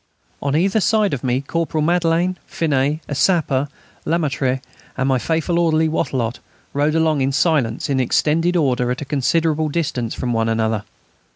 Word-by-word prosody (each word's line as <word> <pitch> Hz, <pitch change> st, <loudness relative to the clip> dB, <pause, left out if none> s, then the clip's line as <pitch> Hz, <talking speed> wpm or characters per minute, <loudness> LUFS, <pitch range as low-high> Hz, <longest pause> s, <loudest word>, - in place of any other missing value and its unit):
On 140 Hz, 0 st, 0 dB
either 195 Hz, +6 st, +2 dB
side 215 Hz, -2 st, +2 dB
of 130 Hz, -, -3 dB
me 130 Hz, 0 st, 0 dB
Corporal 160 Hz, +1 st, -2 dB
Madelaine, 175 Hz, +2 st, +1 dB
Finet, 150 Hz, -1 st, 0 dB
a -, -, -4 dB
sapper, 145 Hz, -4 st, +2 dB, 0.4 s
Lemaître, 140 Hz, -5 st, 0 dB, 0.4 s
and 130 Hz, -, 0 dB
my 130 Hz, -2 st, +2 dB
faithful 165 Hz, +6 st, 0 dB
orderly, 160 Hz, -1 st, +2 dB
Wattrelot, 125 Hz, -6 st, -1 dB, 0.3 s
rode 145 Hz, +2 st, +1 dB
along 160 Hz, -3 st, +2 dB
in 135 Hz, +1 st, +1 dB
silence 135 Hz, -6 st, +1 dB
in 135 Hz, -2 st, 0 dB
extended 160 Hz, +7 st, +1 dB
order 125 Hz, -5 st, +1 dB
at 125 Hz, -, -2 dB
a -, -, -4 dB
considerable 155 Hz, +3 st, +1 dB
distance 145 Hz, -7 st, -2 dB
from 120 Hz, -2 st, -2 dB
one 115 Hz, 0 st, +1 dB
another. 110 Hz, -1 st, 0 dB
150 Hz, 160 wpm, -20 LUFS, 130-165 Hz, 0.4 s, either